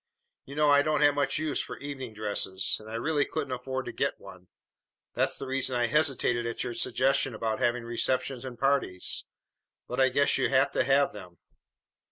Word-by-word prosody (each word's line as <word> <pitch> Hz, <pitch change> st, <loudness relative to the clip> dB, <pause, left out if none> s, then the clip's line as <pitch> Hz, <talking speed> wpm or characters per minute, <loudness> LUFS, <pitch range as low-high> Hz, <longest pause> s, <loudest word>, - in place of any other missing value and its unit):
You 140 Hz, -, -9 dB
know 150 Hz, -1 st, +4 dB
I 145 Hz, 0 st, +6 dB
don't 150 Hz, 0 st, +1 dB
have 145 Hz, -1 st, +6 dB
much 145 Hz, 0 st, 0 dB
use 155 Hz, -2 st, -1 dB
for -, -, -7 dB
evening 135 Hz, -5 st, -7 dB
dresses, 100 Hz, -3 st, -1 dB
and 110 Hz, 0 st, -12 dB
I 110 Hz, -, -5 dB
really 145 Hz, +5 st, +1 dB
couldn't 145 Hz, -3 st, -4 dB
afford 130 Hz, +1 st, -4 dB
to -, -, -4 dB
get -, -, -1 dB
one. 90 Hz, -1 st, -13 dB, 0.7 s
That's -, -, +1 dB
the -, -, -6 dB
reason 130 Hz, -1 st, -1 dB
I 120 Hz, 0 st, +2 dB
hesitated 130 Hz, -4 st, +1 dB
at 115 Hz, -, -3 dB
your 120 Hz, -, -4 dB
suggestion 135 Hz, 0 st, +1 dB
about 110 Hz, 0 st, -2 dB
having 120 Hz, 0 st, +1 dB
receptions 125 Hz, +2 st, -1 dB
and 125 Hz, -2 st, -7 dB
parties. 135 Hz, -9 st, 0 dB, 0.6 s
But 125 Hz, -, -4 dB
I 130 Hz, -, +5 dB
guess 140 Hz, +3 st, +3 dB
you -, -, +2 dB
have 135 Hz, +1 st, +3 dB
to -, -, +1 dB
have 140 Hz, +2 st, +3 dB
them." 90 Hz, -4 st, -11 dB
130 Hz, 195 wpm, -28 LUFS, 115-140 Hz, 0.7 s, I